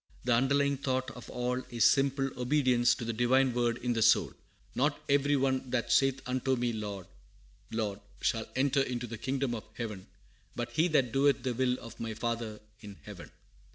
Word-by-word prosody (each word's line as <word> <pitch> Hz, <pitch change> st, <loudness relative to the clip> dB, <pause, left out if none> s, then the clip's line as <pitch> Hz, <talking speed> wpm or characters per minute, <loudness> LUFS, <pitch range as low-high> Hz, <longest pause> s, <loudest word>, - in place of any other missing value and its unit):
The 125 Hz, -, +2 dB
underlying 140 Hz, +3 st, +2 dB
thought 130 Hz, -1 st, -2 dB
of 125 Hz, -, -11 dB
all 125 Hz, +1 st, -2 dB
is 120 Hz, -2 st, +2 dB
simple 135 Hz, +1 st, +3 dB
obedience 125 Hz, -2 st, +2 dB
to 120 Hz, -, -6 dB
the 115 Hz, -, -2 dB
Divine 125 Hz, +3 st, +3 dB
word 120 Hz, -1 st, +1 dB
in 125 Hz, 0 st, -1 dB
the 115 Hz, -, -1 dB
soul. 115 Hz, +1 st, +4 dB, 0.4 s
"Not 145 Hz, +3 st, +1 dB
every 145 Hz, +1 st, +3 dB
one 130 Hz, -1 st, 0 dB
that 125 Hz, -1 st, -1 dB
saith 135 Hz, -1 st, +3 dB
unto 130 Hz, +1 st, 0 dB
me 120 Hz, -1 st, -1 dB
Lord, 100 Hz, -4 st, -5 dB, 0.6 s
Lord, 105 Hz, -3 st, -2 dB, 0.2 s
shall 115 Hz, -1 st, 0 dB
enter 135 Hz, +1 st, +2 dB
into 125 Hz, -2 st, -2 dB
the 115 Hz, -2 st, -7 dB
kingdom 135 Hz, -2 st, -1 dB
of 110 Hz, -, -5 dB
heaven, 105 Hz, -5 st, -6 dB, 0.5 s
but 120 Hz, -, -4 dB
he 160 Hz, +3 st, +2 dB
that 135 Hz, -8 st, +2 dB
doeth 140 Hz, +1 st, +2 dB
the 130 Hz, -2 st, -1 dB
will 125 Hz, +1 st, +1 dB
of 115 Hz, 0 st, -11 dB
my 115 Hz, -1 st, -4 dB
Father 115 Hz, -2 st, -3 dB, 0.2 s
in 105 Hz, -3 st, -11 dB
heaven." 100 Hz, -4 st, -10 dB
125 Hz, 185 wpm, -30 LUFS, 115-135 Hz, 0.6 s, soul